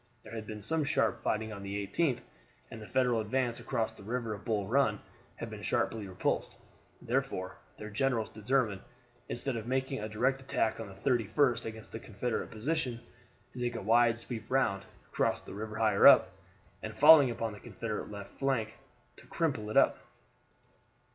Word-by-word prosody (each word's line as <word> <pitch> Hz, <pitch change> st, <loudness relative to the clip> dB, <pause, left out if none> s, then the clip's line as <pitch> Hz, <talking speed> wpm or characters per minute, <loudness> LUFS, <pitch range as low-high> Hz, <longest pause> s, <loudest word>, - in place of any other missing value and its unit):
There -, -, -11 dB
had 110 Hz, -2 st, -6 dB
been 105 Hz, -1 st, -6 dB
some 160 Hz, +7 st, +1 dB
sharp 140 Hz, -, +1 dB
fighting 110 Hz, 0 st, -1 dB
on 100 Hz, -, -8 dB
the 100 Hz, +1 st, -4 dB
18th, 140 Hz, -, 0 dB, 0.5 s
and 110 Hz, -, -8 dB
the 105 Hz, -, -9 dB
Federal 125 Hz, -3 st, +2 dB
advance 120 Hz, +2 st, -1 dB
across 115 Hz, -1 st, -1 dB
the 110 Hz, -, -16 dB
river 115 Hz, +1 st, -3 dB
of 100 Hz, -, -8 dB
Bull 105 Hz, -3 st, 0 dB
Run 115 Hz, -3 st, +2 dB, 0.4 s
had -, -, -7 dB
been -, -, -7 dB
sharply 110 Hz, -3 st, -1 dB
repulsed; 90 Hz, -1 st, -2 dB, 0.5 s
therefore -, -, -2 dB, 0.2 s
their 105 Hz, 0 st, -8 dB
generals 115 Hz, 0 st, 0 dB
determined, 110 Hz, -2 st, 0 dB, 0.5 s
instead 125 Hz, +1 st, -2 dB
of 115 Hz, 0 st, -5 dB
making 130 Hz, +1 st, -1 dB
a 105 Hz, +1 st, -4 dB
direct 130 Hz, +5 st, +1 dB
attack 115 Hz, -4 st, 0 dB
on 115 Hz, -, -5 dB
the 100 Hz, -, -11 dB
31st 120 Hz, +3 st, +1 dB
against 110 Hz, 0 st, -7 dB
the 115 Hz, -, -6 dB
Confederate 115 Hz, +2 st, -3 dB
position, 125 Hz, +1 st, -2 dB, 0.5 s
to 125 Hz, -, -8 dB
take 120 Hz, -1 st, -1 dB
a -, -, -3 dB
wide 115 Hz, +2 st, +4 dB
sweep 115 Hz, -1 st, -5 dB
round, 110 Hz, -7 st, +1 dB, 0.3 s
cross -, -, 0 dB
the -, -, -10 dB
river 110 Hz, +2 st, -5 dB
higher 110 Hz, -1 st, +5 dB
up, -, -, +8 dB, 0.5 s
and -, -, -6 dB
falling 150 Hz, -2 st, +8 dB
upon 115 Hz, -2 st, -3 dB
the 105 Hz, -, -10 dB
Confederate 110 Hz, -1 st, -5 dB
left 100 Hz, -1 st, -8 dB
flank, 125 Hz, -6 st, -1 dB, 0.4 s
to -, -, -15 dB
crumple 140 Hz, -11 st, -1 dB
it -, -, 0 dB
up. -, -, +5 dB
115 Hz, 175 wpm, -31 LUFS, 105-130 Hz, 0.5 s, up